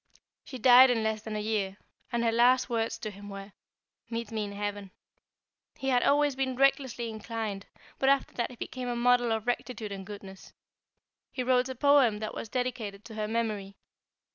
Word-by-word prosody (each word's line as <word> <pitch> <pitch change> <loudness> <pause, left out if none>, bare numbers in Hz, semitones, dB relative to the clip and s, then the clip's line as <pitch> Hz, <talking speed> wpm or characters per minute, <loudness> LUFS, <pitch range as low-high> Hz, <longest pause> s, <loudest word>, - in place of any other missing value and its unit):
"She 260 - -8
died 255 +2 +8
in 230 -3 +1
less 220 -1 -1
than 220 0 -6
a - - -1
year, 210 -2 -2 0.3
and 235 0 0
her 230 - +3
last 250 +2 +4
words 225 -1 -1
to 215 - -5
him 205 +1 -11
were: 195 0 -8 0.6
'Meet 230 -1 -4
me 215 -2 -2
in 200 - -7
heaven.' 205 -1 -4 0.9
He 270 -2 -2
had 250 -2 +3
always 290 0 +3
been 260 -1 -1
recklessly 265 -3 +1
inclined, 220 -2 -5 0.3
but 270 - +3
after 275 0 +2
that 240 - -2
he 250 - -11
became 250 +1 -6
a 240 - -1
model 245 0 +3
of 220 -1 -1
rectitude 240 -3 -3
and 195 -1 -6
goodness. 195 -1 -11 0.8
He 255 - -3
wrote 250 0 +2
a 260 - -5
poem 275 -5 +4
that 215 0 -5
was 225 - -6
dedicated 225 -5 -3
to 225 - -10
her 215 -1 -3
memory. 215 -3 -2
230 Hz, 190 wpm, -29 LUFS, 210-250 Hz, 0.9 s, died